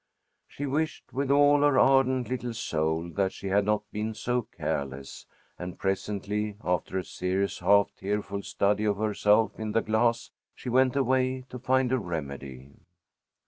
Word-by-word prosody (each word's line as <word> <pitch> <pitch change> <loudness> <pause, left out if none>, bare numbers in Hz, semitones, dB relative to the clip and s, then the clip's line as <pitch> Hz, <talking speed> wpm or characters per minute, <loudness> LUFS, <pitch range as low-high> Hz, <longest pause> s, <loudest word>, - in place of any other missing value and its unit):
She 145 - -6
wished 155 +3 -2
with 135 +1 -1
all 145 +1 +5
her 145 -2 +4
ardent 130 -2 +4
little 120 -1 -3
soul 80 -5 -1
that 95 +1 0
she 100 - -6
had 100 +1 +3
not 105 0 +1
been 110 +1 -3
so 125 +2 0
careless, 70 - -5 0.3
and 90 0 -6
presently, 105 +2 -2
after 90 +1 -1
a 95 - -1
serious, 95 +3 -2
half 100 0 +4
tearful 100 0 -3
study 105 +2 0
of 105 -2 +1
herself 105 0 +2
in 110 -1 -3
the 115 - +3
glass, 115 +2 +1 0.2
she 125 - -7
went 130 +1 +3
away 130 -1 +1
to 125 - -6
find 130 0 +2
a 130 - +2
remedy. 70 - -6
105 Hz, 155 wpm, -28 LUFS, 95-130 Hz, 0.3 s, all